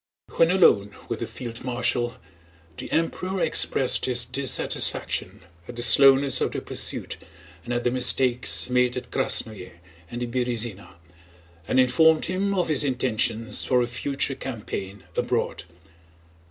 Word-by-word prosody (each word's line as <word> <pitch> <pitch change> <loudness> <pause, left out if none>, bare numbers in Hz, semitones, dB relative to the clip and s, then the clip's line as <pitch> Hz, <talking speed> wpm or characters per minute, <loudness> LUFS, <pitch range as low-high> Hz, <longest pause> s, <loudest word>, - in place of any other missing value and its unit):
When 165 - +4
alone 105 - +3
with - - -3
the - - -4
field 120 -1 -8
marshal 120 -1 -1 0.6
the - - -8
Emperor 185 +3 -2
expressed 130 -7 +1
his 125 -1 +1
dissatisfaction 130 +2 0 0.3
at 120 - -9
the 120 - -1
slowness 135 +2 +5
of - - -1
the - - -3
pursuit - - -3 0.5
and 120 - -7
at 120 0 -1
the 120 - +1
mistakes 125 0 +3
made 125 0 +1
at 125 -1 -8
Krásnoe 100 -5 -1 0.4
and 120 +1 -5
the - - -1
Berëzina, 120 -5 -4 0.7
and 130 - +1
informed 155 +6 +4
him 195 +2 -1
of 180 -2 0
his 155 -3 +2
intentions 115 -4 -1
for 125 -1 +2
a - - 0
future 135 +3 -2
campaign 105 -6 -7
abroad. - - -2
125 Hz, 140 wpm, -24 LUFS, 120-135 Hz, 0.7 s, slowness